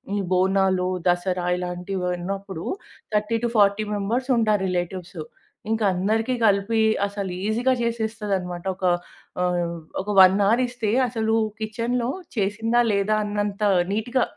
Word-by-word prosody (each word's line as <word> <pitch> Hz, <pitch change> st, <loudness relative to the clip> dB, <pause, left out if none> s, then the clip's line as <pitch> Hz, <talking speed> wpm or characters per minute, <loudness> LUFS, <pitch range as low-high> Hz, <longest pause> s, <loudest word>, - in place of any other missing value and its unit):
ఈ -, -, 0 dB
బోనాలు, 185 Hz, 0 st, +2 dB, 0.2 s
దసరా 180 Hz, 0 st, 0 dB
ఇలాంటివి 180 Hz, +1 st, -4 dB
ఉన్నప్పుడు 195 Hz, -1 st, -5 dB, 0.5 s
30-40 215 Hz, -1 st, +2 dB
మెంబర్స్ 235 Hz, +7 st, -2 dB
ఉంటారు 215 Hz, -3 st, +2 dB
రిలేటివ్స్. 180 Hz, 0 st, -4 dB, 0.5 s
ఇంకా 225 Hz, -1 st, +1 dB
అందరికి 220 Hz, +7 st, 0 dB
గలిపి 205 Hz, +2 st, +3 dB, 0.2 s
అసలు 200 Hz, -2 st, -4 dB
ఈజీగా 240 Hz, +4 st, +2 dB
చేసేస్తదనమాట. 210 Hz, -6 st, -2 dB
ఒక 190 Hz, -, -14 dB, 0.6 s
ఆహ్, 175 Hz, -1 st, 0 dB, 0.3 s
ఒక 200 Hz, -, -11 dB
1 190 Hz, 0 st, +8 dB
అవర్ 230 Hz, +5 st, +3 dB
ఇస్తే 240 Hz, -3 st, -3 dB, 0.2 s
అసలూ 220 Hz, -1 st, 0 dB, 0.2 s
కిచెన్‌లో 235 Hz, +3 st, -2 dB, 0.3 s
చేసిందా 225 Hz, +4 st, +1 dB
లేదా 205 Hz, +1 st, +1 dB
అన్నంత 205 Hz, 0 st, -2 dB, 0.3 s
నీట్‌గా 240 Hz, +5 st, 0 dB
205 Hz, 115 wpm, -24 LUFS, 185-225 Hz, 0.6 s, 1